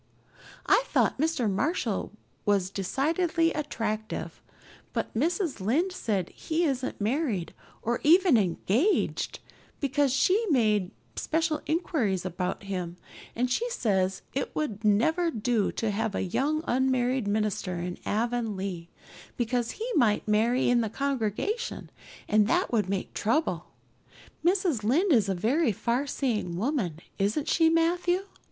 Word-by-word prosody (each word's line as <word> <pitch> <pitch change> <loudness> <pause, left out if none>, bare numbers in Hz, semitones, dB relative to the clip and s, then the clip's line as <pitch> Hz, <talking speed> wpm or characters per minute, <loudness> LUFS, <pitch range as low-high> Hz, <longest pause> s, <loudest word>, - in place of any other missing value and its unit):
I - - +5
thought - - +1
Mr. 310 -6 +1
Marshall 285 - -1 0.3
was 195 -3 +1
decidedly 330 - +1
attractive; 220 -7 -3 0.5
but - - -2
Mrs. 330 - 0
Lynde 295 - +1
says 210 - -1
he 325 +2 -1
isn't 265 -5 -1
married, 215 - -1 0.3
or 235 +1 0
even 345 0 +6
engaged, 215 - +1 0.4
because 280 0 +1
she 370 - +3
made 215 - +2 0.3
special 320 -1 0
inquiries 255 - 0
about 180 +2 -3
him, 180 -3 -4 0.4
and 245 +2 +1
she 475 - 0
says 190 - 0
it 275 - -3
would 230 -9 -3
never 315 - +3
do 225 -5 0
to 225 -2 -1
have 205 0 -1
a - - 0
young 290 - 0
unmarried 255 -2 +1
minister 205 -3 -1
in 175 +1 -4
Avonlea, 205 -6 -2 0.5
because 240 0 0
he 445 +3 -3
might 215 -4 +2
marry 225 +4 +2
in 245 -1 +4
the 220 - -1
congregation 275 - -2 0.4
and 210 -1 +4
that 350 +2 +1
would 210 -5 +1
make 195 -1 -3
trouble. 305 +9 0 0.8
Mrs. 350 - +2
Lynde 315 - +3
is 215 -6 +3
a 190 - +1
very 240 - +2
farseeing 235 -4 -1
woman, 205 - -1 0.2
isn't 210 +10 0
she, 325 -1 +4
Matthew? 350 +3 +2
240 Hz, 130 wpm, -28 LUFS, 205-315 Hz, 0.8 s, even